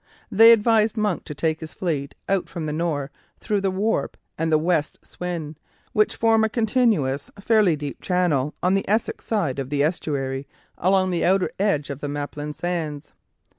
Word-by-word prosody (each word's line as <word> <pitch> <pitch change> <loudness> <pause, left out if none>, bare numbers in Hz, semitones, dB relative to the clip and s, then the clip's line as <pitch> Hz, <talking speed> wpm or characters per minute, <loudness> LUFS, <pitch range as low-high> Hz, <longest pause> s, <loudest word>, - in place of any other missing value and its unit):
They 225 +3 +8
advised 225 0 +3
Monk 210 -4 0
to 150 - -7
take 160 +1 0
his 160 -1 -9
fleet 150 -6 -3
out 195 -2 0
from 165 -2 -5
the 150 - -2
Nore 155 -3 -2 0.3
through 210 -2 -1
the 195 - +1
Warp 205 +4 -1 0.2
and 160 0 -1
the 155 - +5
West 160 -1 0
Swin, 165 -4 -5 0.4
which 215 -1 +2
form 225 -1 +3
a 220 - +2
continuous, 215 - +1
fairly 205 -5 +3
deep 145 -1 -6
channel 165 -6 +1
on 180 +1 +3
the 195 -1 0
Essex 215 +3 0
side 170 - -1
of 135 -1 -4
the 145 0 +1
estuary 140 -4 -2 0.3
along 185 +1 +2
the 175 - 0
outer 190 +1 +2
edge 155 -9 +1
of 140 - -6
the 145 - -4
Maplin 145 +1 -4
Sands. 160 -4 -4
170 Hz, 175 wpm, -23 LUFS, 150-200 Hz, 0.4 s, They